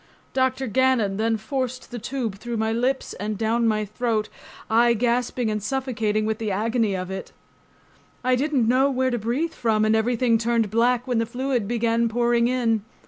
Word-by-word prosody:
Dr. 260 0 +1
Gannon 235 -4 +2
then 225 +1 +1
forced 255 +3 -4
the 240 - -5
tube 230 -4 -4
through 235 0 -4
my 220 0 0
lips 250 +4 -1
and 210 +1 -4
down 230 +2 +1
my 215 -1 +1
throat, 215 0 -1 0.4
I 235 +1 +4
gasping 240 0 0
and 210 0 -2
suffocating 220 -3 -1
with 220 0 -1
the 220 -2 -2
agony 220 +1 0
of 185 0 -4
it. 190 0 -6 0.9
I 255 0 +3
didn't 270 -3 +1
know 260 +3 +4
where 260 -1 0
to 240 - -1
breathe 255 +10 -1
from 220 -3 +1
and 215 0 +3
everything 230 +1 +2
turned 230 -2 +1
black 240 +2 +2
when 245 -3 0
the 230 - 0
fluid 245 -2 -1
began 230 0 +1
pouring 235 0 +2
in. 235 -3 +1
235 Hz, 180 wpm, -24 LUFS, 220-250 Hz, 0.9 s, I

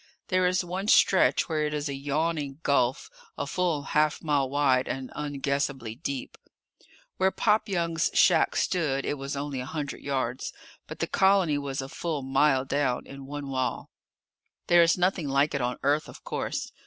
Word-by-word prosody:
There 185 -1 +3
is 185 0 +1
one 185 +3 -4
stretch 190 -2 +4
where 155 -2 0
it 150 0 -1
is 150 0 -2
a 140 - -3
yawning 145 +1 -2
gulf 130 -3 +1 0.3
a - - -2
full 165 -1 -1
half 150 +1 +1
mile 145 -4 +1
wide 135 -2 +2
and 130 -1 -4
unguessably 140 -4 -2
deep. 140 -2 -5 0.8
Where 190 0 +3
Pop 215 +2 +1
Young's 170 -3 0
shack - - +4
stood 145 -7 0
it 145 - -2
was 140 +1 -4
only 140 -1 -3
a 125 - -4
hundred 145 -2 -5
yards, 130 -2 -2 0.3
but - - -8
the - - +2
colony 190 -6 +3
was 135 -1 -4
a - - -6
full 150 0 -4
mile 135 0 +2
down, 135 -3 0
in 135 0 -10
one 145 0 -6
wall. 130 -2 -2 0.7
There 175 0 +6
is 170 +1 +4
nothing 180 -3 +1
like 140 +2 +2
it 140 - -1
on 125 0 -1
Earth, 145 +2 +1
of - - -13
course. - - -3
145 Hz, 175 wpm, -27 LUFS, 135-165 Hz, 0.8 s, There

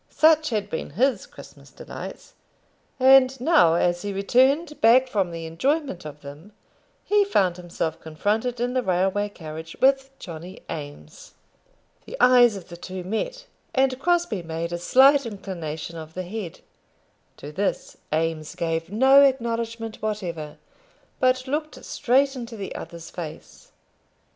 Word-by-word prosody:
Such 315 0 +4
had 210 -4 -1
been 160 - -5
his 265 +2 +1
Christmas - - -14
delights; - - -9 0.7
and 265 0 +6
now, 255 - +4
as 175 0 +1
he 205 - -4
returned 265 - +2
back 245 +4 +6
from 200 -7 0
the 165 -1 -6
enjoyment 260 - -1
of 150 -1 -9
them, 150 +8 -12 0.5
he 415 0 +4
found 190 - +1
himself 170 -2 -4
confronted 215 +10 -2
in 245 +1 -1
the 255 - +1
railway 190 +1 0
carriage 160 -3 -9
with 270 0 +3
Johnny 175 +1 -9
Eames! 150 - -9 0.7
The - - -8
eyes 245 -3 +6
of 195 - -10
the 170 - -9
two 185 +1 -7
met, - - -4 0.3
and 265 -1 +2
Crosbie 340 - +1
made 165 +1 -4
a 175 - -3
slight 275 +9 +5
inclination 170 -6 -6
of 160 0 -10
his 185 0 -4
head. 195 -2 -7 0.8
To 145 - -9
this 195 +6 -3
Eames 160 -1 -2
gave 165 0 -2
no 265 +6 +6
acknowledgment 230 -4 0
whatever, 175 -8 -4 0.6
but 255 0 +2
looked 305 +3 -4
straight 270 +3 +1
into 235 -2 -7
the 195 - -6
other's 170 -2 -9
face. 160 -3 -9
205 Hz, 140 wpm, -24 LUFS, 170-260 Hz, 0.8 s, and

